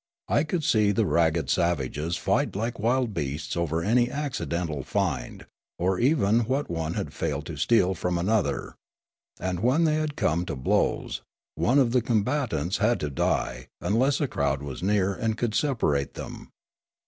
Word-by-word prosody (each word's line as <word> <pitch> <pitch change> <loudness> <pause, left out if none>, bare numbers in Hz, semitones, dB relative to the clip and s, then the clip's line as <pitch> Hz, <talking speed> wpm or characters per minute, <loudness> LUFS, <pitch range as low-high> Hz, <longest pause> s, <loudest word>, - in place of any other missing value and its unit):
I 155 - +2
would 175 -4 0
see 105 -6 +3
the 105 +2 +1
ragged 80 -5 +2
savages 85 -1 0
fight - - 0
like 115 +3 -2
wild 120 +1 +1
beasts 75 -2 -3
over 85 -1 -1
any 120 +5 +3
accidental 90 - -3
find, 70 -5 -2 0.3
or 90 +1 0
even 120 -5 +3
what 135 -1 -1
one 80 0 -2
had - - -3
failed - - -2
to - - -6
steal 95 -5 +3
from 90 -1 -1
another; 100 +4 0 0.7
and 90 -1 -2
when 130 - +3
they 155 -1 +3
had 155 -2 -2
come 80 +3 +1
to - - -3
blows, 65 - 0 0.3
one 130 +4 +2
of 130 -4 +4
the 125 0 +3
combatants 110 - 0
had 115 +2 +2
to 75 - -2
die 65 - -1
unless 130 +6 +2
a 145 - +1
crowd 70 - -1
was 70 -3 -6
near 100 0 +2
and 110 +3 -2
could 120 -3 -1
separate 110 - 0
them. - - -8
100 Hz, 165 wpm, -26 LUFS, 85-120 Hz, 0.7 s, of